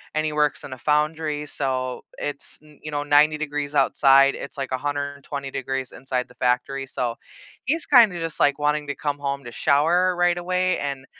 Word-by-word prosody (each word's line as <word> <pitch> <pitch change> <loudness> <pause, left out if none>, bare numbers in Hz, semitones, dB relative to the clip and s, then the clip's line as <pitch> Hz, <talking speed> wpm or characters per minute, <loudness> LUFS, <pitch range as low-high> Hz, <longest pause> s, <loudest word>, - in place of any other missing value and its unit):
and 155 - +1
he 155 - -1
works 150 -1 +1
in 135 - -9
a - - -8
foundry, 150 +1 0
so 130 -3 -3
it's 145 -1 -5
n 150 -1 -19
you 155 - -7
know, 145 0 -2
90 150 +1 +4
degrees 150 -1 -4
outside, 135 0 +5
it's 140 - -8
like 135 -1 -4
a 130 - 0
120 140 -1 -4
degrees 130 -1 -3
inside 130 -1 -3
the 125 - -18
factory, 130 +2 0
so, 120 -3 -3 0.5
he's 310 +5 0
kinda 230 -10 +6
just 165 -1 -4
like 145 -1 +3
wanting 150 0 0
to 145 - -3
come 145 -1 -3
home 140 -1 -3
to 120 - -8
shower 175 +8 +2
right 175 0 +2
away, 185 +1 0
and 140 -2 -4
145 Hz, 195 wpm, -23 LUFS, 135-155 Hz, 0.5 s, kinda